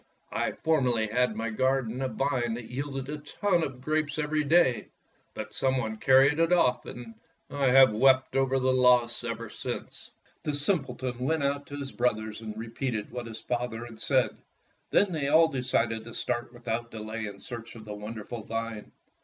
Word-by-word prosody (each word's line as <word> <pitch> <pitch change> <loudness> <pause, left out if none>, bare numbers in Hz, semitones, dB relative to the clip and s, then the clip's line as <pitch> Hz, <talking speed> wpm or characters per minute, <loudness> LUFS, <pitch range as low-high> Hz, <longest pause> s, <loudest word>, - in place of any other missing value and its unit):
I - - -1
formerly 130 -8 +1
had 125 +3 +2
in 110 - -8
my 115 0 -2
garden 130 0 0
a 135 - 0
vine 120 -1 -1
that 120 -1 -8
yielded 135 0 -4
a 150 +1 -4
ton 175 +4 0
of 130 -5 -4
grapes 155 +1 -1
every 150 0 0
day, 150 -5 +3 0.5
but - - -6
some 130 0 +1
one 110 -3 -2
carried 135 +5 +5
it 165 +1 +3
off, 170 -8 +3
and 120 -2 -8 0.4
I 140 -1 +1
have 130 -2 +7
wept 130 +3 +4
over 135 0 +2
its 130 - +1
loss 125 -2 +4
ever 115 -1 -4
since.'' - - -6 0.3
The 150 - -1
simpleton 135 -6 +2
went 145 +4 0
out 140 +1 -1
to 145 - -7
his 140 -1 -5
brothers 110 -3 -1
and 110 -1 -7
repeated 115 0 -4
what 120 -1 -5
his 110 -1 -8
father 120 -1 -3
had 115 -2 -11
said. 130 +2 +2 0.6
Then 200 -2 +3
they 155 -4 -1
all 160 +3 +5
decided 120 -5 0
to 115 - -9
start 120 0 -2
without 120 -1 -4
delay 110 0 -5
in 100 -1 -9
search 115 -2 -8
of 110 -2 -11
the 105 - -6
wonderful 110 +2 -7
vine. 115 0 -5
125 Hz, 185 wpm, -28 LUFS, 115-140 Hz, 0.6 s, have